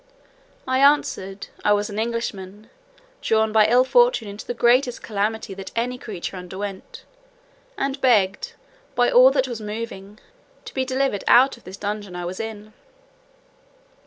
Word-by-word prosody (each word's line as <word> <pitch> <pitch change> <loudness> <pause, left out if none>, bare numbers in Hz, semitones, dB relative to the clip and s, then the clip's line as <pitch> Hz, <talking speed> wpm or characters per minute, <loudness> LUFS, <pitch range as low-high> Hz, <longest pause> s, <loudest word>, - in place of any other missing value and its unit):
I 260 0 +1
answered, 275 -9 +1
"I 210 - +4
was 205 0 -1
an 205 - -4
Englishman, 215 -3 -4 0.5
drawn 220 0 +1
by 215 -1 +5
ill 245 +3 +5
fortune 485 - +3
into 200 +1 -9
the 245 - -3
greatest 245 +1 +2
calamity 215 0 -2
that 195 0 -8
ever - - +1
any 250 +1 -6
creature 195 -4 -6
underwent, 190 +2 -7 0.7
and 275 -2 -2
begged, 210 -7 +2 0.4
by 245 0 +3
all 255 +2 +8
that 265 -1 0
was 235 -3 -6
moving, 210 -2 -7 0.5
to - - -9
be 260 -1 -1
delivered 260 -5 -1
out 260 +3 +6
of 235 - -21
the 185 - -10
dungeon 205 -1 -5
I 175 0 -5
was 180 +2 -6
in." 215 -1 -7
220 Hz, 155 wpm, -22 LUFS, 200-250 Hz, 0.7 s, all